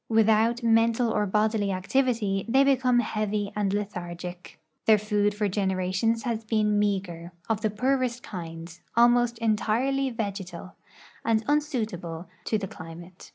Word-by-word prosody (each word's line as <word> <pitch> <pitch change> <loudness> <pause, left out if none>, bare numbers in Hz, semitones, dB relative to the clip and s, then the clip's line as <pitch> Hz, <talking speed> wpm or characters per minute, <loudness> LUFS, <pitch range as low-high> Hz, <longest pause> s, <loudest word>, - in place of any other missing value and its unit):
Without 225 +2 +3
mental 230 +1 +3
or 210 -1 +1
bodily 210 0 +1
activity, 205 0 0
they 265 +3 +5
become 255 -3 +3
heavy 210 -2 -2
and 205 -2 0
lethargic. 180 -3 -5 0.3
Their 220 -1 +7
food 210 0 0
for 210 0 0
generations 190 +3 0
has 230 -3 -2
been 215 -1 +1
mea 205 -1 +2
ger, 170 -2 -10
of 220 -1 0
the 215 - +1
poorest 250 +2 0
kind, 165 -1 -8 0.2
almost 240 0 +4
entirely 230 +5 +1
vegetal, 195 -6 -5 0.5
and 220 -1 +1
unsuitable 215 - -2 0.2
to 220 - +1
the 200 -2 -4
climate. 170 +2 -11
215 Hz, 135 wpm, -26 LUFS, 190-230 Hz, 0.5 s, Their